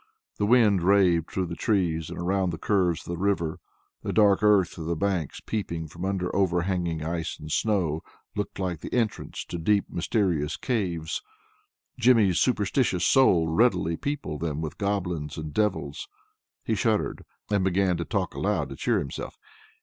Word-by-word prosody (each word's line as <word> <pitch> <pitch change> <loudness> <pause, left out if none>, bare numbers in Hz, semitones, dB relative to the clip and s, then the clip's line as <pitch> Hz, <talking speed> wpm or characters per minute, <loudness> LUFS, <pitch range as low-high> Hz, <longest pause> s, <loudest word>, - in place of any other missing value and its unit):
The 105 - +1
wind 105 -5 +5
raved 90 -3 +3
through 95 - -1
the 85 -1 -5
trees, 85 -6 0
and - - -7
around 95 +1 0
the 80 - -4
curves 90 -3 +1
of - - -13
the 85 - -5
river. 85 -5 0 0.4
The - - -3
dark 105 -2 +4
earth 100 -5 +3
of 80 - -5
the 85 - 0
banks 90 -4 -2
peeping 85 -7 -3
from 85 +4 -6
under 95 -2 -2
overhanging 90 -3 0
ice 80 +1 -3
and 75 0 -8
snow, 90 -8 +1 0.3
looked 105 - -3
like 90 -4 -2
the - - -8
entrance 115 -4 -2
to 85 - -5
deep 100 +4 +2
mysterious 85 -5 0
caves. 85 - -2 0.8
Jimmy's 115 -7 +4
superstitious 105 -5 +1
soul 90 -9 +5
readily 85 -2 +2
peopled 140 - -4
them 80 -3 -2
with 80 -2 -5
goblins 90 -7 -2
and 80 -2 -6
devils. 95 -9 -1 0.6
He - - -1
shuddered, - - 0 0.3
and 100 -2 +2
began 95 -1 +2
to 85 - -2
talk 95 -1 -2
aloud 95 -8 -1
to - - -7
cheer - - +1
himself. 70 - -5
90 Hz, 165 wpm, -26 LUFS, 80-100 Hz, 0.8 s, wind